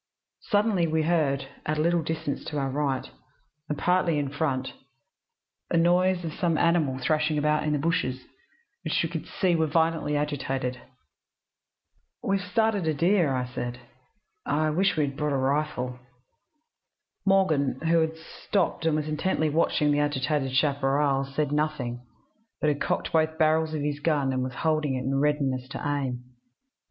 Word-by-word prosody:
Suddenly, 205 -5 +2
we 160 0 +1
heard, 150 -5 +1 0.2
at 155 0 -1
a - - +1
little 170 +1 +2
distance 160 -3 -3
to 150 - -4
our 135 -1 -1
right, 140 -2 -1 0.6
and 150 - -2
partly 180 -3 +2
in 145 -2 -1
front, 135 -3 -2 1.0
a 170 - +1
noise 180 +1 +3
as 160 - -3
of - - -12
some 170 -3 +1
animal 160 -6 +2
thrashing 150 +3 +1
about 150 +1 +2
in 150 - +1
the - - +1
bushes, 145 -5 -1 0.6
which - - 0
we - - -1
could - - -5
see 180 -3 +1
were 160 -1 +2
violently 160 -1 +1
agitated. 135 -3 -2 1.4
"'We've 195 0 +1
started 205 -1 0
a 155 - +1
deer,' 150 -7 +2
said. 120 -1 -4 0.7
'I 155 +1 +1
wish 190 +4 +1
we 150 - +3
had 135 -1 -5
brought 150 -1 -1
a - - +1
rifle.' 130 -2 -1 1.2
"Morgan, 160 -10 +2
who 165 +1 +3
had 160 0 0
stopped 165 +1 -2
and 160 - +2
was 155 0 -1
intently 155 0 0
watching 150 -1 +2
the 145 - +2
agitated 145 -1 0
chaparral, 140 -1 +2
said 140 +1 -2
nothing, 145 -5 -1 0.6
but 150 - +2
had 145 -1 -1
cocked - - -1
both 160 0 +2
barrels 155 0 +2
of 150 - -2
his 145 0 -2
gun, 145 -4 +1
and 130 - 0
was 130 0 -4
holding 155 -4 0
it 130 - -3
in 135 +1 0
readiness 140 -3 0
to 135 - -7
aim. 135 -4 -2
150 Hz, 165 wpm, -26 LUFS, 135-165 Hz, 1.4 s, noise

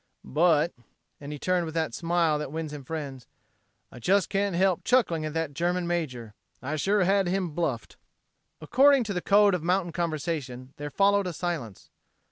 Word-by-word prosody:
"But," 160 +2 +2 0.5
and 145 0 -8
he 150 - -5
turned 180 +3 0
with 160 - -7
that 160 -1 -1
smile 170 -3 +1
that 150 -2 -5
wins 160 -1 -4
him 145 -2 -7
friends, 135 -4 -6 0.6
"I - - -11
just 190 - +2
can't 200 -2 0
help 185 0 +2
chuckling 190 -11 +2
at 155 0 -5
that 165 -3 -2
German 175 +4 -1
major. 130 -11 -3 0.3
I 140 +5 -4
sure 195 +5 +2
had 195 0 +2
him 180 -2 -1
bluffed." 150 -7 -3 0.6
According 265 - +4
to 210 -2 -4
the 180 - -2
code 205 +1 +4
of 180 - -1
mountain 175 +1 0
conversation 150 -6 -4
there 145 0 -5
followed 200 +5 +2
a 180 - -4
silence. 150 - -5
170 Hz, 175 wpm, -27 LUFS, 150-185 Hz, 0.6 s, According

